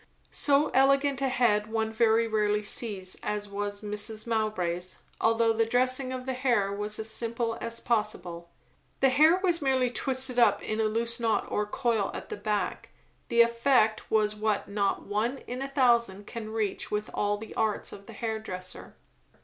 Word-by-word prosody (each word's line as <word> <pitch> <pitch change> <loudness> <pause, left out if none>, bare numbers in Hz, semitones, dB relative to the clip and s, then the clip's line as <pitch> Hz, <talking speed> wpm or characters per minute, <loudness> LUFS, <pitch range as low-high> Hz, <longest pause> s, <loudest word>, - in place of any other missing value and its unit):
So 285 +1 +3
elegant 275 +1 +3
a 270 - +1
head 220 -4 +2
one 220 0 -1
very 230 0 +3
rarely 210 -1 +1
sees, 200 -3 -2
as 210 0 -2
was 205 +1 -4
Mrs. 210 +1 -2
Mowbray's, 185 -6 -2 0.2
although 225 0 +3
the 225 +1 +2
dressing 255 +2 +1
of 255 -1 -5
the 260 - -2
hair 240 -6 +1
was 210 +1 -3
as 220 - -4
simple 230 +1 -2
as 230 0 -3
possible. 180 -8 -2 0.5
The 270 - +5
hair 310 +6 +5
was 345 -3 +2
merely 260 -3 +2
twisted 260 -1 0
up 235 - +4
in 215 0 -3
a - - +2
loose 230 +2 0
knot 225 -2 +1
or 210 0 0
coil 225 -3 0
at - - -7
the - - -4
back; 205 -2 -2 0.4
the 235 - +4
effect 235 -2 +2
was 215 -1 +2
what 210 -1 -1
not 200 -1 -1
one 215 +6 -1
in 250 +2 -5
a 270 - -2
thousand 235 -7 +2
can 220 -1 -7
reach 220 -2 -2
with 210 0 -3
all 205 0 0
the 220 +1 -9
arts 220 -2 -1
of 200 0 -11
the - - -10
hair 220 -1 -3
dresser. 185 -4 -7
220 Hz, 175 wpm, -28 LUFS, 210-245 Hz, 0.5 s, The